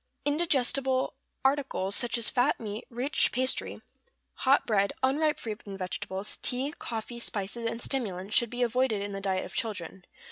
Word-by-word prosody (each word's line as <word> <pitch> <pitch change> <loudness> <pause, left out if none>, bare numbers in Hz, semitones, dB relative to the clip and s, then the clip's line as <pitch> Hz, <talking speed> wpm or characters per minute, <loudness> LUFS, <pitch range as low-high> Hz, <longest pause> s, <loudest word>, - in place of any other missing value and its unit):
Indigestible 275 -4 +2 0.3
articles, 265 -8 +1
such 240 -1 +3
as 230 - +2
fat 255 +4 +2
meat, 215 -1 -5
rich 250 +5 +1
pastry, 255 +1 +1 0.5
hot 275 +1 +3
bread, 200 -3 +2
unripe 300 +3 +2
fruit 215 -2 -4
and 195 -1 -5
vegetables, 195 +1 -3
tea, 265 +4 -1
coffee, 235 +1 -5
spices, 230 +1 -2
and 230 - -4
stimulants, 205 -7 -2
should 235 - +4
be 245 +1 -1
avoided 235 -3 +1
in 205 - -4
the 195 0 -4
diet 190 -1 0
of - - -10
children. 190 -5 -3
235 Hz, 155 wpm, -29 LUFS, 200-260 Hz, 0.5 s, should